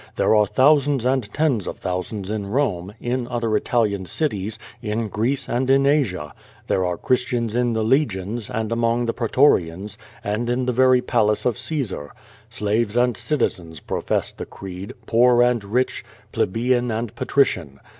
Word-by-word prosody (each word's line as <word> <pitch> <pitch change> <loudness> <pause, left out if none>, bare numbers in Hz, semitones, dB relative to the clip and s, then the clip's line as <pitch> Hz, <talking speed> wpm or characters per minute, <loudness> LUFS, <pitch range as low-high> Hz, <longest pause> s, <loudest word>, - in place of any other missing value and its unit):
"There - - +3
are 105 -1 +4
thousands 140 0 +3
and 130 -5 0
tens 140 - 0
of - - -5
thousands 95 +2 -4
in 105 -2 -3
Rome, 100 -6 -1
in 120 0 -2
other 115 -3 -1
Italian 105 -4 0
cities, 105 - -2 0.2
in 110 +1 -2
Greece 115 +7 -1
and 130 +2 -1
in 135 +1 +4
Asia. 105 - +1 0.3
There 95 - +1
are 90 -1 -1
Christians 120 -2 0
in 120 -1 +1
the 110 -1 0
legions 110 -4 0
and 110 0 -3
among 115 +1 +1
the 115 - -1
pretorians, 105 - +1 0.2
and 110 +3 -2
in 125 +1 0
the 125 - 0
very 130 0 +4
palace 105 -3 +1
of 125 -4 0
Caesar. 120 - -3 0.4
Slaves 110 0 -1
and 125 -1 +3
citizens 90 - -2
profess - - -2
the - - -7
creed, 95 +6 -8
poor 120 +1 +5
and 120 -3 +1
rich, 120 +6 -1 0.3
plebeian 120 +4 +1
and 115 0 -3
patrician. 90 - 0
115 Hz, 155 wpm, -22 LUFS, 100-125 Hz, 0.4 s, poor